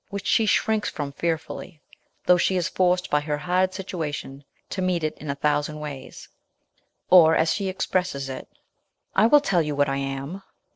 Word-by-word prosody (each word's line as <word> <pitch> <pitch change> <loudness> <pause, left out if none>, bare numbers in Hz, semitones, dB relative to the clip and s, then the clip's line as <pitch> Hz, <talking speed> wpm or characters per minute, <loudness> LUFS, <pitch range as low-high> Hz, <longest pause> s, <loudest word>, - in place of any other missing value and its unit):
which 200 -1 -6
she 225 - +3
shrinks 220 0 +1
from 145 -2 -5
fearfully, 165 +2 -4 0.5
though 180 0 +5
she 185 +2 +2
is 175 -1 0
forced 180 0 +1
by 150 - +4
her 150 0 -2
hard 180 +4 +1
situation 160 -7 -5 0.2
to 190 - -4
meet 180 -3 0
it 155 - -1
in 150 - -7
a 140 - -1
thousand 150 +1 0
ways; 140 -3 -8 0.8
or 165 -3 +8
as 160 0 +2
she 200 -2 -2
expresses 180 -6 -1
it, 130 -1 -7 0.4
" - - -45
I 215 +3 +5
will 295 +4 +6
tell 190 -11 +2
you 150 -2 -2
what 145 -1 +2
I 135 - -1
am, 135 +5 -4
a 195 - -17
165 Hz, 190 wpm, -24 LUFS, 145-185 Hz, 0.8 s, or